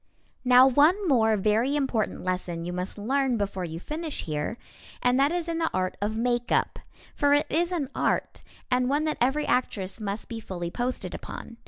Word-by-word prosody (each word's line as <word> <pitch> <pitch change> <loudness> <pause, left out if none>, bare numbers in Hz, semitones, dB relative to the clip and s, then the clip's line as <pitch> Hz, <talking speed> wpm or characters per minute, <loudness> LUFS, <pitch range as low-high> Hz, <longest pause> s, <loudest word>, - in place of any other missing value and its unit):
Now 250 0 +7
one 310 +10 +4
more 225 -6 +4
very 220 +7 +2
important 265 -7 -1
lesson 180 -2 -3
you 175 - -4
must 180 +3 -4
learn 260 +3 +1
before 195 -3 -2
you 165 0 -6
finish 310 - -5
here, 155 +8 -3 0.4
and 250 +1 +2
that 280 +2 +4
is 345 -1 -2
in 335 -1 -2
the 325 - +1
art 185 0 -1
of 215 +2 -1
makeup. 240 +1 0 0.3
For 285 0 +3
it 290 - +2
is 345 +3 +1
an 320 -6 -1
art, - - -1 0.3
and 250 0 +2
one 290 +2 +1
that 310 -1 -2
every 270 +5 +2
actress 200 -6 -1
must 205 +1 -4
be 230 -2 -5
fully 175 -5 -5
posted 250 +4 -3
upon. 230 - -8
245 Hz, 185 wpm, -27 LUFS, 200-285 Hz, 0.4 s, Now